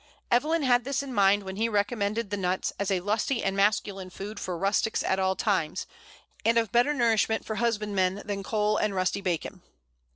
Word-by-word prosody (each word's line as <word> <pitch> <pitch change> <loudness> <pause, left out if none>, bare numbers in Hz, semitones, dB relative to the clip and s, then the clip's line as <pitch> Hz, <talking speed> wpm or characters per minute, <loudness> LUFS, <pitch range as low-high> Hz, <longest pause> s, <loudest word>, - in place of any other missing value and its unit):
Evelyn 300 +6 +2
had 245 -2 +3
this 275 +2 -1
in 270 -2 -7
mind 200 -1 +4
when 190 0 -7
he 225 +2 +1
recommended 205 0 -1
the - - 0
nut 185 -1 -1
as 200 0 -1
"a 190 -2 +1
lusty 220 +6 0
and 195 0 0
masculine 195 -2 0
food 200 +3 -7
for 180 -2 -4
rustics 200 +4 0
at 190 - 0
all 190 0 +1
times, 185 -7 -1 0.6
and 230 +1 +3
of 225 -3 +1
better 245 +5 +3
nourishment 225 -3 +2
for 220 - -4
husbandmen 205 -4 0
than 200 -1 -3
cole 210 +1 0
and 210 -2 0
rusty 185 +2 0
bacon." 175 -5 -3
205 Hz, 190 wpm, -27 LUFS, 195-230 Hz, 0.6 s, mind